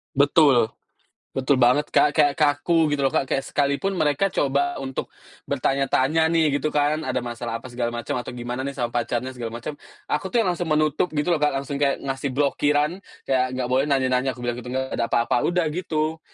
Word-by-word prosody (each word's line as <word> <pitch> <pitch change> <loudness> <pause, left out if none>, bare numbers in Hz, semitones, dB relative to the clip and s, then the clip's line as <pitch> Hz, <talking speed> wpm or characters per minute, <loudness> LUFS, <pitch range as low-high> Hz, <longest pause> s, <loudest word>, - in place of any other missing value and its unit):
Betul 140 -5 +4 0.6
betul 135 0 +1
banget, 125 +5 +4
Kak, 150 - +5
kayak 145 -1 +4
kaku 155 +2 +3
gitu 145 -2 0
loh, - - +2
Kak, 135 - +1
kayak 135 - 0
sekalipun 145 +7 0
mereka 155 +3 +1
coba 140 +1 +1
untuk 135 -1 -5 0.3
bertanya-tanya 135 +3 +1
nih 155 -4 +2
gitu 155 +2 -2
kan, 150 +1 +1
ada 130 -1 -1
masalah 120 -1 -5
apa 130 - -10
segala 120 -1 -3
macam, 120 +3 -3
atau 125 0 -5
gimana 125 +2 -4
nih 140 - -3
sama 120 -3 -2
pacarnya 120 +1 -2
segala 115 -1 -5
macem. 145 +4 -6 0.3
Aku - - -1
tuh 235 - +4
yang 190 - +1
langsung 175 0 -3
menutup 155 +3 +1
gitu 150 +3 0
loh, 170 - +3
Kak, 150 -1 +1
langsung 140 +1 -3
kayak 140 -1 +1
ngasih 135 0 -3
blokiran, 145 +4 +1 0.3
kayak 130 -1 +2
nggak 130 -1 -2
boleh 135 +2 +3
nanya-nanya, 130 -2 +1
aku 120 - -12
bilang 120 0 -2
gitu, 125 +1 -7
nggak 130 0 -2
ada - - +1
apa-apa, 120 +1 +1
udah 175 -2 +1
gitu. 160 -1 -2
140 Hz, 200 wpm, -23 LUFS, 125-150 Hz, 0.6 s, Kak